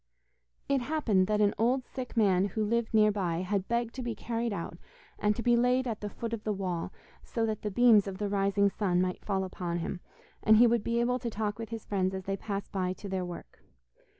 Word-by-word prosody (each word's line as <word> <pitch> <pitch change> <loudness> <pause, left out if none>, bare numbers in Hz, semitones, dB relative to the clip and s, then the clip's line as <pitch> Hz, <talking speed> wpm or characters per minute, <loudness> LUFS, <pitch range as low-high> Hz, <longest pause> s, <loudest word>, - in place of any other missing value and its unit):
It 275 -2 +2
happened 240 -9 +1
that 210 0 +1
an 205 -1 +4
old 250 +3 +2
sick 255 -3 -7
man 195 -4 +4
who 210 +2 -1
lived 235 +1 0
near 215 -1 +5
by 180 -4 -1
had 195 +1 -1
begged 235 -1 -1
to 260 - -5
be 240 -2 -3
carried 230 +2 -2
out 170 -3 -5 0.4
and 210 0 +2
to 235 - -4
be 240 -1 +4
laid 250 +2 +3
at 225 -3 -3
the 210 - -3
foot 230 +2 -5
of 225 -2 -4
the 215 - -1
wall 185 -3 -3 0.3
so 230 -1 -2
that 220 -2 -2
the 210 - -2
beams 215 -1 +5
of 190 -1 -5
the 205 0 -2
rising 200 0 +2
sun 185 -4 0
might 185 0 -1
fall 195 -2 -1
upon 180 -2 -3
him, 175 +2 -4 0.4
and 220 0 +6
he 240 - +8
would 235 -2 +2
be 235 0 0
able 250 +1 +1
to 240 -1 -3
talk 210 -1 -3
with 225 -2 -5
his 225 -1 -6
friends 190 -2 0
as 190 - -5
they 195 +1 -2
passed 200 0 -5
by 185 -2 -1
to 200 - -9
their 190 -1 -2
work. 175 -1 -9
210 Hz, 235 wpm, -30 LUFS, 190-235 Hz, 0.4 s, he